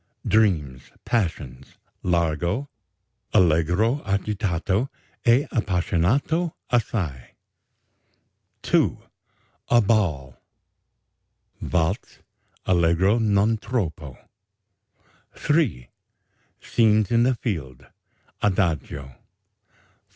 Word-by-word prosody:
DREAMS, 80 -12 +1
PASSIONS 80 - -3 0.2
(Largo) 85 - 0 0.7
(Allegro 90 - +3
agitato 100 +2 -1 0.4
e 125 +5 +5
appassionato 110 - 0 0.2
assai) 95 - -2 1.3
2. - - +2 0.7
A 120 - +5
BALL 85 - 0 1.2
(Waltz: 90 +3 -1 0.5
Allegro 90 +5 +3
non 105 0 +2
troppo) 80 - -4 1.2
3. 145 - 0 0.7
SCENE 110 -2 +2
IN 115 0 +4
THE 125 +1 +3
FIELDS 80 - -5 0.6
(Adagio) 85 -8 0
4. 65 - -16
95 Hz, 65 wpm, -24 LUFS, 80-115 Hz, 1.3 s, e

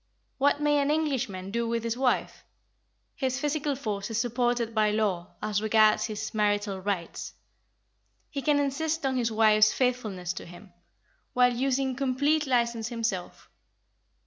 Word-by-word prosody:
What 285 +1 +3
may 295 0 +2
an 280 0 +1
Englishman 260 -12 -1
do 235 +1 -1
with 230 0 -1
his 230 0 -1
wife? 255 0 0 0.7
His 260 -2 -1
physical 295 -1 -1
force 210 -6 -4
is 225 - -2
supported 240 -1 0
by 215 -1 +3
law 205 -5 -1
as 210 -1 0
regards 215 0 +4
his 215 -2 -5
"marital 205 -2 0
rights." 185 -4 -4 1.0
He 280 - -3
can 295 +1 +2
insist 300 +3 -1
on 265 -1 0
his 235 -2 0
wife's 215 -1 +5
faithfulness 215 -9 -1
to - - -8
him, 175 +2 -14 0.6
while 250 0 +4
using 265 +1 0
complete 285 +3 +1
licence 235 -3 +1
himself. 225 -7 -4
235 Hz, 145 wpm, -27 LUFS, 210-270 Hz, 1.0 s, wife's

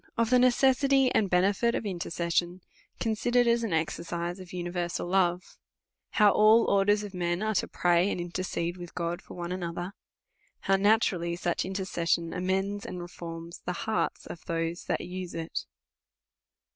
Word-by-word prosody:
Ofthe 230 +2 +4
necessiti/ 265 +1 +4
and 205 -3 +2
hencjit 195 +6 +2
of - - -5
Intercession, 175 -1 -1 0.4
consider 240 +2 +2
ed 240 - +1
as 235 0 +3
an 225 - -2
exercise 170 +2 -2
of 185 -2 -11
universal 175 -1 -3
lore. 180 -1 +2 0.7
How 210 -2 +6
all 215 +3 +6
or 195 -1 +3
ders 205 +1 +3
of 205 -2 -7
men 175 +1 -1
arc 215 -2 +1
to - - 0
praij 175 +2 +2
and - - -3
intercede 175 0 -3
icith 175 -1 -10
God 170 -1 -2
for - - -12
one 175 0 -4
another. 175 +1 -4 0.7
How 195 - +3
natnrallij 195 -4 +2
such 175 -1 -1
intercession 175 -3 -1
amends 195 +2 -1
and 180 - -6
reforms 170 -1 -8
the 180 - -1
hearts 220 -1 -1
of 170 - -9
those 165 +1 -2
that - - -1
use 180 0 -6
it. 165 0 -4
180 Hz, 160 wpm, -28 LUFS, 175-205 Hz, 0.7 s, How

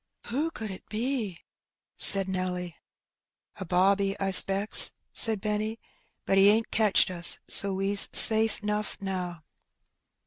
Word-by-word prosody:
'' - - -21
Who 295 +7 -4
could 220 -9 -11
it 185 - -15
be? 220 -5 -7 0.3
'' - - -69 0.2
said 195 -1 +2
Nelly. 180 -2 -8 0.4
" - - -56
A - - -8
bobby, 195 +3 -3
I 195 - -5
^specks,^^ 195 +2 +6 0.2
said 220 -3 +2
Benny; 215 +2 -7 0.2
" 230 - -49
but 195 - -2
he 195 - +2
ain^t 220 +2 -1
catched 210 -4 0
us, 175 -1 +1
so 200 -1 +2
we's 195 +1 +1
safe 220 -1 +5
*nough 210 0 -6
now." 180 -4 -9
200 Hz, 150 wpm, -23 LUFS, 190-215 Hz, 0.4 s, ^specks,^^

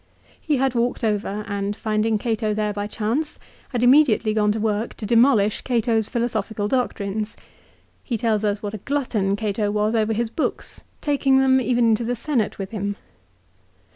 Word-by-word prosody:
He 300 -3 0
had 265 -1 +1
walked 240 0 -1
over, 210 -1 -1
and 200 +1 -3
rinding 215 0 +1
Cato 220 -1 -1
there 210 -1 -1
by 205 0 -3
chance, 235 +9 -2 0.3
had 245 -2 -1
immediately 245 -5 +5
gone 210 -1 +2
to 220 - -2
work 215 +1 -1
to 215 - -7
demolish 230 -2 +3
Cato's 230 -3 0
philosophical 220 -3 -2
doctrines. 215 -3 -2 0.7
He 240 - -2
tells 220 -1 0
us 205 0 -1
what 205 0 -4
a 215 - -5
glutton 225 -7 -1
Cato 205 0 -1
was 210 +1 0
over 220 -1 +1
his 225 +1 -1
books, 315 - -3 0.2
taking 275 -2 +2
them 265 0 +4
even 240 -1 +2
into 225 +1 +2
the 245 +2 -1
Senate 240 -3 -1
with 195 -1 -6
him. 205 -2 -3
220 Hz, 170 wpm, -22 LUFS, 210-245 Hz, 0.7 s, immediately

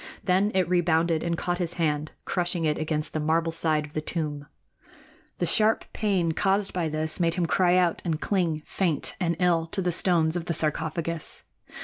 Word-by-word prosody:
Then 190 +2 +2
it 185 -2 +2
rebounded 170 -2 +2
and 170 -1 -1
caught 175 +1 -2
his 175 -1 -1
hand, 155 -3 -1
crushing 175 -2 -1
it 150 -1 0
against 155 -1 -2
the 155 - -1
marble 165 +2 +1
side 160 -2 +2
of 150 - -15
the 155 - -2
tomb. 150 -3 -3 0.9
The - - 0
sharp 220 0 +2
pain 190 -6 0
caused 195 +4 0
by 170 -3 -1
this 155 +2 -1
made 170 -1 +1
him 180 - 0
cry 180 +2 +3
out 175 -2 +1
and 160 -3 -1
cling, 170 -7 -1
faint 170 -6 -1
and 170 -3 0
ill, 170 -3 +2
to 195 - -2
the 180 -1 0
stones 170 -2 +2
of 175 -2 -3
the 170 - +1
sarcophagus. 160 +1 -2
170 Hz, 190 wpm, -26 LUFS, 155-180 Hz, 0.9 s, cry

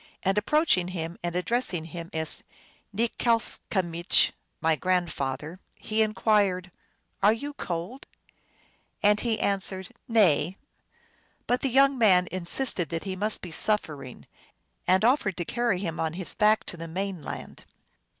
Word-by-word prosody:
And 195 0 +2
approaching 210 - +2
him 170 -2 -5
and 175 0 -3
addressing 180 -3 -1
him 170 +1 -8
as 160 -1 -1 0.5
Nikslcamich, 200 -6 +1
" - - -48
My 160 0 +2
grand 180 0 0
father," 150 +6 -4 0.2
he 220 +1 -1
inquired, 200 -3 +1 0.3
" - - -43
are 205 +2 +6
you 285 +6 -6
cold! 185 - -5 0.5
" - - -35
And 210 0 +5
he 225 -2 -1
answered, 190 -1 0 0.2
"Nay;" 190 -6 +3 0.9
but 245 +1 0
the 270 - 0
young 270 +1 +4
man 185 -5 +5
insisted 185 +1 0
that 165 -1 -3
he 190 -2 -4
must 210 +3 0
be 180 - -7
suffering, 150 - -1 0.6
arid 190 +4 +4
offered 235 -7 +2
to 175 - -2
carry 235 -3 0
him 170 -3 -4
on 160 -1 -1
his 180 0 -5
back 215 0 +3
to 175 - -6
the 165 0 -7
main 190 +1 -4
land. - - -8
190 Hz, 150 wpm, -27 LUFS, 170-220 Hz, 0.9 s, are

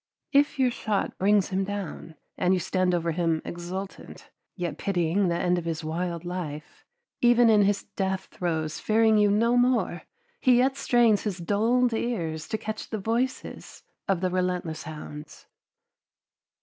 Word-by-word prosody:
If 285 +1 +3
your 255 -2 +3
shot 215 -4 -2
brings 200 0 +3
him 190 0 0
down, 190 -5 -6 0.2
and 185 +1 +2
you - - 0
stand 180 +1 +1
over 170 -1 0
him 165 -1 0
exultant, 180 +3 -7 0.2
yet 175 -4 -4
pitying 185 0 +1
the 170 -1 0
end 180 0 +1
of 170 - -8
his 165 -1 -3
wild 170 +2 -3
life, 160 -5 -6 0.4
even 240 -1 +5
in 210 -1 +5
his 200 0 +2
death 190 -2 -3
throes 160 -3 -2
fearing 220 0 +3
you 205 0 +4
no 230 +4 +3
more, 245 -8 +2 0.4
he 250 -2 +4
yet 265 +2 +3
strains 240 -6 +3
his 205 -4 -3
dulled 225 +7 +1
ears 165 -10 -2
to 220 - -2
catch 215 0 -6
the 220 - -3
voices 230 +5 -3 0.2
of 190 -3 +1
the 185 -1 0
relentless 180 -3 -1
hounds. 150 -1 -9
190 Hz, 155 wpm, -26 LUFS, 170-220 Hz, 0.4 s, even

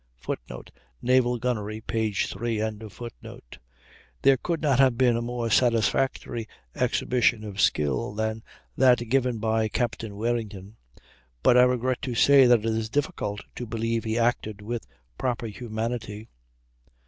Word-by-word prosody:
[Footnote: - - -7 0.3
"Naval 125 -1 +2
Gunnery," 110 -3 -2
p. 110 -1 -1
3.] 115 +3 -2 1.7
There 135 -1 +6
could 165 +5 -2
not 140 -5 +2
have 130 -3 +4
been 125 -2 +4
a 115 - -1
more 120 -1 -3
satisfactory 115 0 +1 0.3
exhibition 120 -3 +1
of 100 -2 -4
skill 75 +1 +1
than 110 +1 -2 0.3
that 125 -2 +4
given 125 -2 +1
by 110 0 +1
Captain 115 -2 -3
Warrington; 110 -2 -3 0.7
but 125 - +5
I 125 - +8
regret 125 0 0
to 125 -3 -3
say 135 +1 +6
that 120 -3 +5
it - - -7
is 110 -1 -1
difficult 105 -6 -2
to 120 - -6
believe 115 0 -1
he 110 0 -1
acted 115 -3 0
with 115 +2 -4 0.3
proper 120 -2 -1
humanity. 110 -1 -5
115 Hz, 135 wpm, -26 LUFS, 110-125 Hz, 1.7 s, I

